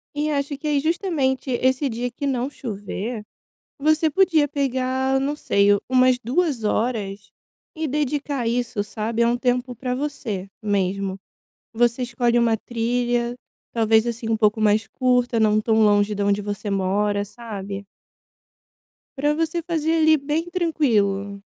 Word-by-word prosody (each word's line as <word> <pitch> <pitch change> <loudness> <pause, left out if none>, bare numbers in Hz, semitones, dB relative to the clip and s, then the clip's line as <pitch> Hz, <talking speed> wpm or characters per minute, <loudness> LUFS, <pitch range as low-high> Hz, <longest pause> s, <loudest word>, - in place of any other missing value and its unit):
E 300 +1 0
acho 280 0 -2
que 300 - -5
é 295 -1 +2
justamente 295 -5 0
esse 260 +3 +1
dia 240 +1 -3
que 255 +4 -6
não 260 -1 0
chover, 215 -2 -5 0.6
você 310 +2 +3
podia 325 -3 +3
pegar, 265 -2 0
não 280 +2 -1
sei, 200 -8 +2 0.2
umas 255 -1 +4
2 270 0 0
horas 210 -3 -2 0.4
e 315 0 -2
dedicar 290 0 -1
a 235 - -1
isso, 235 -2 -1
sabe? 220 +2 -3
É 235 - +4
um 240 +1 +1
tempo 250 0 -1
para 250 +2 -3
você 245 -9 -4
mesmo. 195 -2 -1 0.5
Você 240 +2 +1
escolhe 240 -1 +1
uma 230 -1 +3
trilha, 240 +1 -1 0.4
talvez 225 0 +3
assim 235 -1 -3
um 225 - +2
pouco 215 0 +2
mais 215 0 +3
curta, 250 -2 +1
não 215 -1 +3
tão 220 0 +2
longe 205 0 +3
da 205 0 -1
onde 200 0 +2
você 205 0 -4
mora, 200 +1 0
sabe? 200 -3 -7 1.3
Para 295 +2 +2
você 325 +1 -1
fazer 325 -2 0
ali 315 -1 +5
bem 305 +4 -2
tranquilo. 210 - 0
245 Hz, 150 wpm, -23 LUFS, 215-280 Hz, 1.3 s, ali